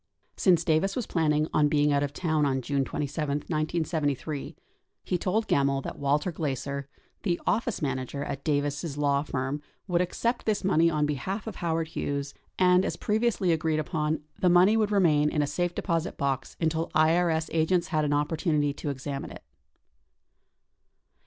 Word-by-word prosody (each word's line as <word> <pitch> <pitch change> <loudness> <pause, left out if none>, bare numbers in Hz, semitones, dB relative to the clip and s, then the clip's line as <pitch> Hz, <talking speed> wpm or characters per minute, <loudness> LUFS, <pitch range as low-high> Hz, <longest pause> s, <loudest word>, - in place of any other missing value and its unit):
Since 175 -3 +3
Davis 170 +5 +1
was 245 - -2
planning 155 -2 +1
on 150 -1 +4
being 145 0 +2
out 140 - +2
of 145 -1 -1
town 155 -1 0
on 135 -2 0
June 140 +2 0
27, 150 +3 -3 0.2
1973, 155 -3 -2 0.5
he 180 - -1
told 215 +6 0
Gemmill 140 -1 +2
that - - -6
Walter 145 +5 +1
Glaeser, 140 -3 -3 0.3
the 175 -4 0
office 230 -6 0
manager 135 0 -2
at 140 - -5
Davis' 145 0 -1
law 140 -1 +2
firm, 140 0 -3 0.3
would 175 -2 +2
accept 230 +7 -1
this 210 -2 +1
money 170 -3 +4
on 150 -2 +1
behalf 150 - -3
of 220 -4 -6
Howard 165 -1 -1
Hughes, 140 -3 -3 0.2
and, 180 0 +5
as - - -2
previously 215 -4 +1
agreed 160 -1 +1
upon, 155 0 -1 0.2
the 180 - +3
money 180 +5 +6
would 215 -2 +2
remain 155 -7 +4
in 150 -1 +1
a - - +1
safe 175 +5 -2
deposit 165 -1 -1
box 140 -1 -2
until 165 0 0
IRS 160 0 +3
agents 170 +2 +2
had 155 -4 +1
an 145 - 0
opportunity 150 0 +1
to 145 - -5
examine 140 0 -4
it. - - -11
155 Hz, 165 wpm, -27 LUFS, 145-175 Hz, 0.5 s, money